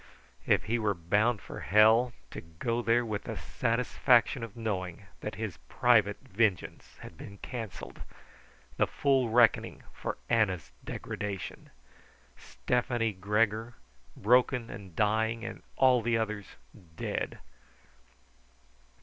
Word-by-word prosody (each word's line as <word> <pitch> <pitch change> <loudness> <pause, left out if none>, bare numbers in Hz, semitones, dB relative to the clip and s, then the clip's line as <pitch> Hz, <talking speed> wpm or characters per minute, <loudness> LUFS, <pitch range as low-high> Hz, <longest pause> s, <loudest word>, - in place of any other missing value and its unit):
If - - +3
he 120 +2 0
were 105 -3 +1
bound 105 +7 +1
for - - -8
hell, 110 +5 +5 0.2
to - - -6
go 115 +9 -3
there 120 +1 +2
with 105 -3 -4
the - - -5
satisfaction 120 +1 +2
of 115 -1 -7
knowing 100 -4 -3
that 105 - -5
his 105 -8 -5
private - - +3
vengeance 100 -3 -1
had 80 - -11
been 100 - -9
cancelled. 110 -2 -7 0.8
The - - +3
full 135 -4 +2
reckoning 115 0 +3
for - - -4
Anna's 95 - +1
degradation: 100 -2 -5 0.7
Stefani 120 -2 -1
Gregor, 105 +4 0 0.4
broken 125 +2 +3
and 95 -5 -10
dying, 110 +3 +1
and 115 - -7 0.2
all 130 -2 +5
the 115 0 +1
others 110 -2 -3 0.5
dead! - - -3
110 Hz, 115 wpm, -30 LUFS, 100-120 Hz, 0.8 s, hell